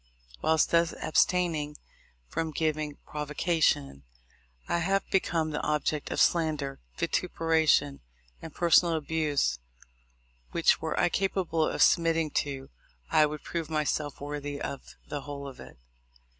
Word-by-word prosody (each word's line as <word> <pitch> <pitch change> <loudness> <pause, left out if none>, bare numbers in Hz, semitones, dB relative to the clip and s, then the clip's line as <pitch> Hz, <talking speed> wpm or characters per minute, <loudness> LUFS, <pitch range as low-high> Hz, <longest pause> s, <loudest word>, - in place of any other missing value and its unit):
Whilst 160 -1 +2
thus 170 0 +3
abstaining 160 -4 +1 0.5
from 160 - -2
giving 155 -1 -1
provocation, 150 - 0 0.6
1 170 - 0
have 195 +3 0
become 165 -4 +1
the 150 - -2
object 150 0 -1
of - - -2
slander, 155 -5 +1 0.2
vituperation, 160 - +1 0.4
and 160 - -8
personal 170 0 +4
abuse 155 - 0 0.9
which, - - +3
were - - -2
I - - +3
capable 180 -4 0
of - - +2
submitting 165 -2 +3
to, 140 -2 -3 0.4
I 155 - +5
would 150 0 -7
prove 165 -2 -4
myself 150 -1 -1
worthy 145 0 -5
of 140 - -6
the 145 - -4
whole 140 0 -7
of 135 - -10
it. - - -12
155 Hz, 125 wpm, -28 LUFS, 145-165 Hz, 0.9 s, I